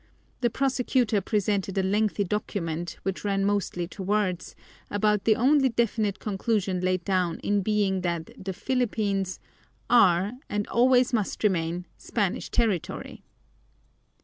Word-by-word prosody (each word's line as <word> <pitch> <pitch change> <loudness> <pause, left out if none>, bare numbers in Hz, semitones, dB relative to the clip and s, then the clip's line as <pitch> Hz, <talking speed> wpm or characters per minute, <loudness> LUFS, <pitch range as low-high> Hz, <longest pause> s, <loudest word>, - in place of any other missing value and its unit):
The 240 -2 +2
prosecutor 250 -4 +1
presented 200 -2 -1
a 190 - +2
lengthy 205 +2 +1
document, 175 -4 -3
which 195 -1 -3
ran 195 -1 0
mostly 200 -4 -1
to 195 - -9
words, 190 -2 -1 0.3
about 210 0 +1
the 220 - +5
only 270 +3 +4
definite 220 -4 0
conclusion 200 -2 -1
laid 185 -1 0
down 185 -4 +1
in 205 0 +1
it - - -2
being 200 -2 +1
that 170 -2 -3
the 190 - -3
Philippines 205 -6 -1 0.5
"are, 195 -5 +5 0.2
and 205 0 -2
always 250 +1 +4
must 215 -2 -1
remain, 175 -3 0
Spanish 205 -5 -2
territory." 215 -9 -1
205 Hz, 130 wpm, -26 LUFS, 185-220 Hz, 0.5 s, the